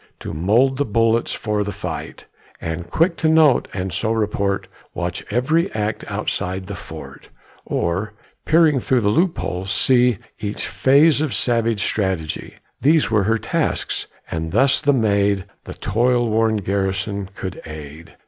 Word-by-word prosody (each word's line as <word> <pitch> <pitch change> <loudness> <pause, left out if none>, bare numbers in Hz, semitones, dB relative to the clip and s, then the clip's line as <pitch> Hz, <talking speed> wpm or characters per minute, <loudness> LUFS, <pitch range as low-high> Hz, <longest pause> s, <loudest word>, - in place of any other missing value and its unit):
To - - -5
mould 115 - +2
the 145 - +2
bullets 115 0 +1
for 105 -2 -1
the 100 - -4
fight, - - -6 0.3
And, 85 +1 -5
quick 165 - +2
to 160 - +2
note 155 -5 +5
and 95 -2 -4
so 110 +6 -1
report, 100 -3 0 0.3
Watch 90 0 -3
every 155 +8 +1
act 105 0 -2
outside 95 +1 -3
the 100 - -6
fort; 90 - -10 0.4
Or, 95 +5 -1 0.3
peering 155 -3 +4
through 125 0 +1
the 100 - +2
loopholes, 105 - 0
see 125 0 +3 0.2
Each 105 0 -3
phase 145 +3 +4
of 155 -5 -1
savage 115 -3 +1
strategy 95 -7 -2 0.3
These 150 -2 +3
were 105 -3 +3
her 110 +2 +2
tasks, - - -2 0.2
and 80 0 -3
thus 135 +5 +4
the 145 - +3
maid 100 -6 +2 0.2
The - - -8
toil 120 +2 +1
worn 110 0 +2
garrison 100 0 -2
could 95 -2 -6
aid. 75 +1 -10
110 Hz, 150 wpm, -21 LUFS, 95-125 Hz, 0.4 s, note